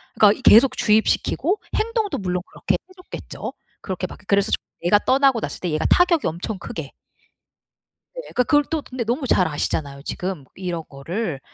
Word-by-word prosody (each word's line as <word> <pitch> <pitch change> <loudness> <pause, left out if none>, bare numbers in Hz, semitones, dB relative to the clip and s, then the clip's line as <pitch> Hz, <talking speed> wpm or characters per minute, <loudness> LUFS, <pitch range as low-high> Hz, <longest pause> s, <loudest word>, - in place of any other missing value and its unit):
그러니까 210 -1 +5
이 - - -12
계속 250 +1 +7
주입시키고 240 - +2 0.2
행동도 445 -2 0
물론 180 -2 -2
그렇게 - - -2
해 370 - -10
줬겠죠. 365 - -8 0.3
그렇게 185 -1 -4
막 - - -12
그래서 200 +1 +2
좀 - - +3 0.3
내가 205 +4 +5
떠나고 265 -1 +3
났을 - - -5
때 180 - -2
얘가 155 - -1
타격이 355 -4 +4
엄청 175 +6 -4
크게. 160 -5 -7 1.2
네. - - -4
그 250 - +4
그걸 290 +2 +3
또 320 -2 -1
근데 255 -3 -5
너무 260 +4 -1
잘 180 -3 +3
아시잖아요 145 -2 -3
지금 180 -6 -4
이런 175 -3 -4
거를. 160 +3 -4
210 Hz, 365 characters per minute, -22 LUFS, 175-275 Hz, 1.2 s, 계속